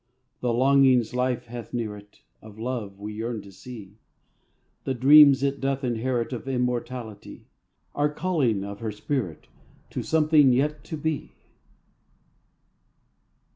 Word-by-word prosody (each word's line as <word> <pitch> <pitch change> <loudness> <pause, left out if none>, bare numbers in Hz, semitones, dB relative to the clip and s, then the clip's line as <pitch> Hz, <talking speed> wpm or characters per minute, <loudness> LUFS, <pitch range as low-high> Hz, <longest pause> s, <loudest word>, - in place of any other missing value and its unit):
The 125 - 0
longings 130 -1 +4
life 125 0 -1
hath 120 -1 -8
near 110 -3 -3
it 105 0 -16 0.2
Of 110 -1 -13
love 110 -4 -4
we 105 +1 -6
yearn 110 0 -4
to 100 - -13
see; 105 -1 -11 0.8
The 135 - -2
dreams 140 +1 +7
it 140 0 -1
doth 135 0 -1
inherit 120 0 -1
Of 125 +2 -6
immortality; 125 -3 -4 0.5
Are 145 +1 +1
callings 150 - 0
of 100 0 -7
her 110 -2 -3
spirit 105 - -4 0.5
To - - -3
something 155 -4 +4
yet 150 +4 0
to 160 - -5
be. 155 0 -3
125 Hz, 130 wpm, -25 LUFS, 110-140 Hz, 0.8 s, dreams